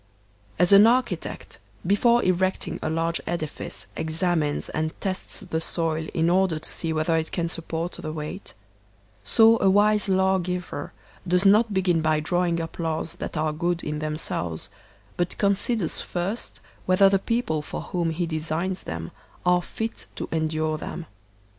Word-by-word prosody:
As 180 +3 +5
AN 200 +2 +9
architect, 235 -8 -1 0.3
before 235 +6 +4
erecting 185 +1 0
a - - -1
large 165 +1 -1
edifice, 155 -3 -4
exam 165 +1 0
ines 145 -1 -2
and 155 0 -3
tests 190 -1 -4
the 160 - -3
soil 160 -1 -1
in 165 -1 +2
order 180 -2 +3
to 155 - -6
see 165 - -1
whether 160 +1 +1
it 160 0 -1
can 170 -1 -1
support 165 +1 -3
the 155 - -6
weight, 155 +5 -6 0.7
so 225 - +5
a 195 - +5
wise 205 +1 +4
lawgiver 185 -4 0 0.4
does 180 +2 +2
not 215 +3 +5
begin 185 -4 +2
by 155 -1 +2
drawing 175 +2 0
up 165 +1 -6
laws 160 -1 -2
that - - -5
are 155 0 0
good 170 +2 -1
in 150 0 -3
themselves, 150 - -3 0.5
but 175 0 -1
considers 200 -2 +1
first 185 +6 -3 0.3
whether 185 +2 +6
the 195 0 +3
people 230 -8 -1
for 150 - -6
whom 175 -2 -1
he 165 +2 -1
designs 165 +3 -2
them 80 -1 -5 0.3
are 180 0 +4
fit 225 +5 -5
to - - -4
endure 155 -1 0
them. 170 - -6
170 Hz, 155 wpm, -25 LUFS, 160-190 Hz, 0.7 s, AN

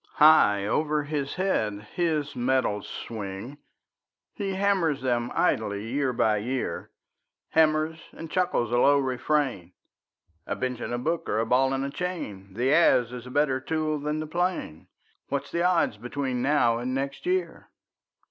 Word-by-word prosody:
High 150 -11 +6
over 150 +6 0
his 145 -2 -3
head 110 - 0
his 155 -4 -1
metals 125 -4 0
swing; 110 +5 -7 0.7
He 195 -3 -3
hammers 190 -8 +1
them 120 -2 0
idly 105 0 0
year 135 +1 0
by 110 -3 +2
year, 120 -5 -3 0.6
Hammers 160 0 +2
and 165 -1 -9
chuckles 180 - 0
a 120 - +3
low 145 +3 +5
refrain: 130 - -1 0.7
"A - - -2
bench 125 -1 -3
and - - -5
a 120 - -1
book 160 +7 -2
are 105 - 0
a 115 - +1
ball 130 +3 +3
and 135 0 -1
a 140 - -4
chain, 105 - -5
The 130 +5 +2
adze 125 -7 +4
is 125 0 -7
a - - -8
better 135 0 +1
tool 155 +1 -1
than 150 +1 -2
the 155 - -3
plane; 175 - -2 0.4
What's 140 0 -3
the 170 - -1
odds 175 -11 +2
between 125 +2 -3
now 125 -4 +3
and 125 +2 -2
next 140 - -4
year?" 370 0 -2
135 Hz, 155 wpm, -26 LUFS, 120-155 Hz, 0.7 s, High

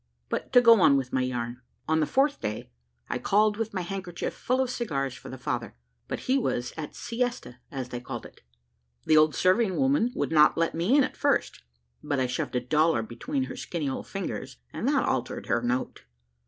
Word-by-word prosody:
But - - -3
to 245 - +8
go 230 -4 +7
on 140 - +6
with 130 -1 -3
my 130 - +2
yarn. 125 -1 -3 0.3
On 160 0 +2
the 155 - +1
fourth 280 +2 +2
day, 105 -11 -4 0.4
I 125 - -2
called 210 - +2
with 225 -1 -2
my 190 - -2
handkerchief 180 -1 -4
full 255 +1 -1
of 260 -1 +1
cigars 140 - -2
for - - -11
the 130 - -7
father, 120 -2 -3 0.3
but - - -4
he 265 +2 +2
was 125 - -2
at 155 -2 -6
siesta, 240 - -3
as 130 -3 -5
they 120 - -4
called 125 - -7
it. - - -14 0.6
The 155 - +4
old 155 -2 +5
serving 185 - +3
woman 265 -3 +2
would - - -1
not 150 -1 +5
let 165 0 +1
me 180 - +2
in 285 - +6
at - - -3
first: - - 0 0.4
but 145 -2 -1
I 130 - +2
shoved 125 0 -3
a - - +3
dollar 150 0 +2
between 265 - -3
her - - -6
skinny 165 -5 -4
old 135 - -4
fingers, - - -5 0.2
and - - -3
that - - +3
altered - - -2
her 120 - +1
note. 125 +1 -2
160 Hz, 210 wpm, -27 LUFS, -, 0.6 s, to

